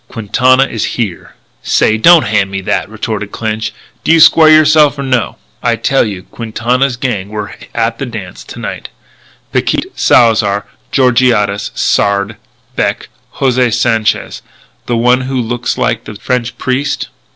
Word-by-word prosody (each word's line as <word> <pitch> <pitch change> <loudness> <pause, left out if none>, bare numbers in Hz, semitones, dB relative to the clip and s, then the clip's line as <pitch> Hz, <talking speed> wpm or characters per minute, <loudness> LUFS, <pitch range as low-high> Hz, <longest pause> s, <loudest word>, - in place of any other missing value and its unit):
Quintana 130 +4 +2
is 115 -5 -4
here." 105 -8 -4 0.3
"Say, 110 - +2
don't 165 +8 +6
hand 105 -2 +1
me 95 0 -4
that," - - -2
retorted - - -4
Clinch. 110 -1 -3 0.3
"Do - - +2
you 165 - +5
square 160 0 +7
yourself 155 -1 +5
or 140 - -4
no?" 125 -4 -1 0.2
"I - - +1
tell 135 -2 +1
you 95 -3 -6
Quintana's 120 +4 -2
gang 105 -7 -3
were 105 -1 -6 0.2
at 115 0 -1
the 135 - -3
dance 95 - -8
to - - -11
night - - -6 0.6
Picquet, - - -1
Salzar, 105 -4 +3 0.3
Georgiades, 120 -6 +2
Sard, 100 +1 0 0.4
Beck, - - -2 0.3
José 125 -2 +1
Sanchez 115 -2 0 0.5
the 120 - 0
one 125 +2 +3
who 130 0 -3
looks 120 +1 -2
like 120 -2 -1
a 105 - -8
French 125 +3 -3
priest. 135 +2 -2
120 Hz, 145 wpm, -13 LUFS, 105-130 Hz, 0.6 s, square